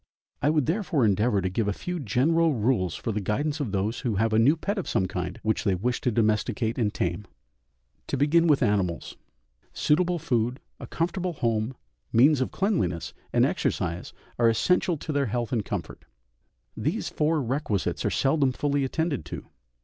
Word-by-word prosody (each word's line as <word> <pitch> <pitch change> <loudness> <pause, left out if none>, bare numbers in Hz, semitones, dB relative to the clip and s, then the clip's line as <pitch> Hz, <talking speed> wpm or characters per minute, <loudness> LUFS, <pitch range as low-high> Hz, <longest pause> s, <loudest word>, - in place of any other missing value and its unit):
I 145 - +3
would 150 -3 +2
therefore 165 - +1
endeavour 105 +1 +2
to 95 - -1
give 105 +3 -1
a 105 - +1
few 180 - -4
general 150 +6 +2
rules 105 -6 +1
for 115 - -3
the 105 0 -2
guidance 145 +10 -1
of 135 -8 -2
those 100 +4 -1
who 120 -6 -1
have 110 +2 +1
a 110 - +4
new 140 +8 +4
pet 200 +5 -2
of 190 - -4
some 95 - +1
kind, 90 +5 -4
which 110 0 0
they 100 -3 +2
wish 120 +7 -1
to 125 - +1
domesticate 110 +2 0
and 105 -3 +1
tame. 90 +2 -2 0.8
To 140 - -1
begin 160 +5 +4
with 145 -4 +4
animals; 100 -6 0 0.6
suitable 175 +3 +2
food, 125 -5 -1 0.2
a - - -8
comfortable 175 +2 -2
home, 115 -2 -1 0.4
means 130 +4 +5
of 130 - 0
cleanliness, 100 - -1 0.2
and - - +4
exercise 85 0 -2 0.3
are 115 -1 +5
essential 175 +8 +2
to 155 - -5
their 140 -2 +1
health 120 +1 -2
and 115 -5 0
comfort. - - -5 0.7
These - - -2
four 155 +1 +1
requisites 125 -6 -1
are - - +1
seldom 135 -1 +2
fully 145 +1 0
attended 160 +2 -1
to. - - -7
125 Hz, 180 wpm, -26 LUFS, 105-155 Hz, 0.8 s, means